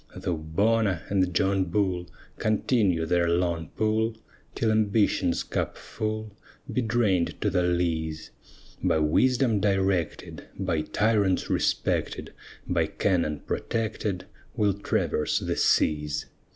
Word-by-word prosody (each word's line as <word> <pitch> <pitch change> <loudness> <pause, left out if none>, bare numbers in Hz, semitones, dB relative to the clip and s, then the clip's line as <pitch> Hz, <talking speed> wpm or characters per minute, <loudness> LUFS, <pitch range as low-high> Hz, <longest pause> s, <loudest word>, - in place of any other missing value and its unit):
Though 85 - -2
Bona 100 +4 +1
and 95 -2 +2
John 95 +1 +2
Bull 90 -1 -1 0.3
Continue 105 -6 +1
their 85 0 +2
long 85 -2 0
pull, 110 +1 +1 0.4
Till 110 -2 +1
ambition's 105 -4 +2
cup - - -3
full 110 -1 -4 0.4
Be 130 - +1
drain'd 110 -7 +1
to 105 - +1
the 90 -1 +2
lees; 80 -3 -1 0.5
By - - +2
wisdom 115 - +3
directed, 95 -4 -1
By 80 -2 0
tyrants 105 +2 +1
respected, - - -1 0.3
By - - +1
cannon 85 -6 0
protected, 110 -4 -2 0.3
We'll 105 -2 +2
traverse 95 -5 0
the - - -1
seas. 75 -1 +1
95 Hz, 110 wpm, -26 LUFS, 85-110 Hz, 0.5 s, wisdom